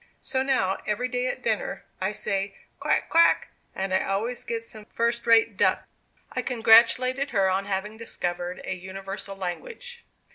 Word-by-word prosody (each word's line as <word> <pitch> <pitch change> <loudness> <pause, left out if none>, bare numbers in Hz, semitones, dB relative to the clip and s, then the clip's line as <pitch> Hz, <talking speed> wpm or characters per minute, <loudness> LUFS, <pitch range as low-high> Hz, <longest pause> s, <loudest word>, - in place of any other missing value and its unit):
So 260 - -1
now 255 -8 +1
every 210 +4 0
day 250 0 -1
at 255 - -4
dinner, 220 -2 -1 0.2
I 190 +2 0
say 200 -2 -2 0.2
'quack, - - +1
quack,' 335 +1 +4 0.3
and 190 0 -2
I 190 - +3
always 220 +6 -2
get 230 -1 -3
some 215 -2 -10
first 235 +1 -1
rate 230 -1 +5
duck." - - +3 0.5
I - - -2
congratulated 250 +3 +4
her 195 -5 +2
on 195 +1 0
having 205 +2 -3
discovered 175 -5 -4
a - - -2
universal 195 +2 -7
language. 445 - -6
215 Hz, 155 wpm, -26 LUFS, 195-245 Hz, 0.5 s, rate